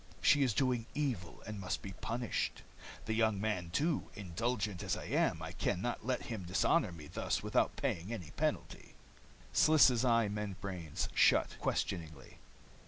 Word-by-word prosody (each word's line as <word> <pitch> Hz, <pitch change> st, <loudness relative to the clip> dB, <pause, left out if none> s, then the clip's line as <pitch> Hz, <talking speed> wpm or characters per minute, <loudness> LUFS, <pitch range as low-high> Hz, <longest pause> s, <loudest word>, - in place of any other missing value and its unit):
She 145 Hz, -, +5 dB
is 125 Hz, -6 st, +2 dB
doing 125 Hz, -4 st, +1 dB
evil, 120 Hz, -, -2 dB
and 105 Hz, -1 st, -6 dB
must 90 Hz, -2 st, -3 dB
be 95 Hz, -, -6 dB
punished. 120 Hz, +3 st, -2 dB, 0.4 s
The 110 Hz, -, -1 dB
young 110 Hz, -2 st, +2 dB
man, 100 Hz, -5 st, -1 dB
too 150 Hz, -, 0 dB
indulgent 100 Hz, +1 st, -2 dB
as -, -, -1 dB
I -, -, -6 dB
am, -, -, +1 dB
I -, -, -5 dB
can 90 Hz, -, -1 dB
not 120 Hz, +4 st, -3 dB
let 125 Hz, +1 st, -1 dB
him 110 Hz, -4 st, -5 dB
dishonor 90 Hz, 0 st, +2 dB
me 80 Hz, -3 st, -10 dB
thus -, -, -2 dB
without -, -, +1 dB
paying 85 Hz, +6 st, -2 dB
any 95 Hz, -10 st, -6 dB
penalty." -, -, -3 dB, 0.6 s
Sliss' 135 Hz, -6 st, +6 dB
eye 115 Hz, -3 st, +4 dB
membranes 100 Hz, -5 st, -4 dB
shut, -, -, +4 dB
questioningly. 80 Hz, -6 st, -3 dB
105 Hz, 155 wpm, -34 LUFS, 90-120 Hz, 0.6 s, Sliss